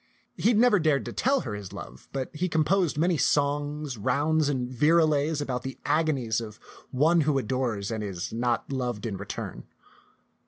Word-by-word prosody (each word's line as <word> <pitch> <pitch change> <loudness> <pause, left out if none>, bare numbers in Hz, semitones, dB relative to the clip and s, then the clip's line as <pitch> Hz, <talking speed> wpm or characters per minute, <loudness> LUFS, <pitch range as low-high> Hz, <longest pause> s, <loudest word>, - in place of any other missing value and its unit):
He 225 - +2
had 235 - +3
never 225 -3 +5
dared 155 -4 +2
to - - -6
tell 275 +2 +2
her 115 - -5
his 100 -3 -7
love, 65 +1 -10
but 135 +3 -4
he 180 +4 -1
composed 160 +1 +1
many 170 +2 +2
songs, 145 -2 0
rounds, 145 +7 +1
and 130 -3 -1
virelays 150 +2 +2
about 125 -4 -2
the 130 -1 -6
agonies 135 -8 +1
of 110 -2 -9 0.3
one 160 +6 +3
who 150 -2 +2
adores 120 -4 -1
and 110 -1 -3
is 95 -2 -5
not 120 +2 -1
loved 125 -5 -2
in 110 -4 -3
return. 100 +1 -6
140 Hz, 170 wpm, -27 LUFS, 120-155 Hz, 0.3 s, never